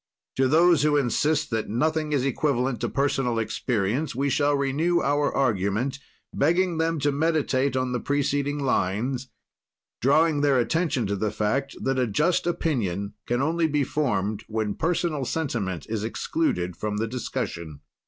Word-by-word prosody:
"To 130 0 +3
those 165 +2 +5
who 150 0 +3
insist 145 +4 +1
that 110 -1 -1
nothing 155 +7 0
is 135 -3 +1
equivalent 135 -2 0
to - - -1
personal 135 -4 0
experience, 115 +4 -1
we 140 +2 0
shall 145 0 +2
renew 150 +6 +1
our 145 0 +1
argument, 120 +2 0 0.3
begging 170 +3 +2
them 165 0 0
to 145 +1 +2
meditate 140 -3 +1
on 130 -1 -1
the 125 - -1
preceding 145 +1 0
lines, 125 0 -1 0.7
drawing 150 +3 +3
their 140 -2 +3
attention 135 -1 +1
to 100 +1 -1
the 105 +2 -1
fact 110 +7 -1
that 135 0 0
a 125 - +2
just 150 - +1
opinion 110 - -1
can 120 +2 +1
only 165 +2 +1
be 150 -2 +1
formed 110 -8 -1
when 110 -2 -2
personal 165 - -1
sentiment 110 - -2
is 110 -2 -3
excluded 110 - -1
from 105 +2 -3
the 110 - 0
discussion. 85 - -5
135 Hz, 155 wpm, -25 LUFS, 110-150 Hz, 0.7 s, those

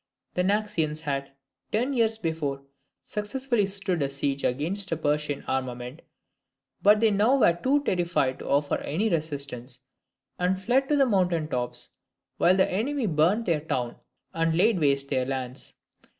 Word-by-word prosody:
The 180 - +1
Naxians 180 -6 0
had, 140 -3 -3 0.4
ten 245 +6 0
years 225 -3 +2
before, 160 -7 -3 0.4
successfully 220 +1 -1
stood 195 -4 -1
a 140 - +1
siege 140 0 -1
against 175 +10 -1
a 165 - 0
Persian 150 -1 -1
armament, 125 +1 -3 0.8
but 210 +1 +6
they 225 -1 +4
now 215 +7 +3
were 175 - +5
too 270 +11 +1
terrified 170 - 0
to - - -7
offer 145 +1 +1
any 195 +10 -1
resistance, 140 - -3 0.6
and 185 +1 +1
fled 250 +7 +1
to 300 - +3
the 275 -1 +5
mountain 180 -8 +1
tops, 125 -3 -3 0.5
while 180 +2 +4
the 190 - +4
enemy 250 +7 -1
burnt 180 +6 +2
their 165 -4 +1
town 130 -6 -2 0.4
and 165 0 +1
laid 205 +1 +4
waste 140 -2 +2
their 130 -2 0
lands. 130 -1 -5
170 Hz, 150 wpm, -26 LUFS, 140-210 Hz, 0.8 s, but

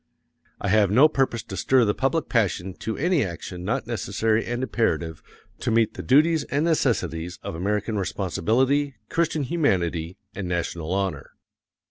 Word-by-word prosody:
I 100 - -2
have 105 -1 +4
no 130 +10 +6
purpose 135 -6 0
to 95 - -8
stir 130 +4 +3
the 105 - +2
public 140 +6 0
passion 95 -5 0
to 110 - -3
any 170 -1 +2
action 90 -1 -6
not 125 +8 -1
necessary 110 0 0
and 120 +2 -2
imperative 85 -11 -1 0.4
to 125 - -2
meet 115 -1 +2
the - - -6
duties 155 +4 +4
and 145 +3 0
necessities 90 - 0
of - - -5
American 105 +5 -1
responsibility, 125 - 0
Christian 160 -3 0
humanity, 90 - 0 0.2
and 95 -2 -4
national 85 -1 -3
honor. 95 -1 -2
110 Hz, 150 wpm, -24 LUFS, 95-135 Hz, 0.4 s, no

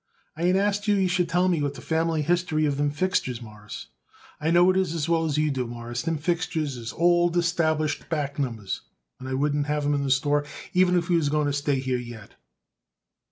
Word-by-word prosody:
"I 160 - -8
ain't 180 +1 +4
asked 205 +1 0
you 205 - +4
you 190 -2 +2
should 180 -1 +1
tell 180 +1 +2
me 175 -3 +2
the 145 -2 -2
family 160 +2 0
history 170 -1 +1
of 145 -2 0
them 145 0 +1
fixtures, 145 -6 -1
Mawruss. 105 -2 -9 0.5
I 155 - 0
know 175 +2 +5
it - - -2
as 170 -5 0
well 165 -1 +2
as 150 -2 -1
you 155 -1 +2
do, 130 -3 -2
Mawruss, 120 +1 -5
them 165 +4 -1
fixtures 160 -3 -1
is 115 -1 -6
old 175 0 +3
established 160 -3 0
back 145 -3 -2
numbers, 115 -8 -3 0.4
and 130 - -7
I 130 - -1
wouldn't 145 +1 0
have 150 0 -1
'em 145 - +2
in 140 - 0
the 140 - -1
store 145 +2 +2 0.3
even 180 0 +4
if 175 -1 -1
we 175 -2 +3
was 150 -3 +1
going 150 0 +1
to 145 - 0
stay 145 -1 0
here 130 -1 -1
yet." 120 -4 -10
150 Hz, 215 wpm, -25 LUFS, 140-175 Hz, 0.5 s, know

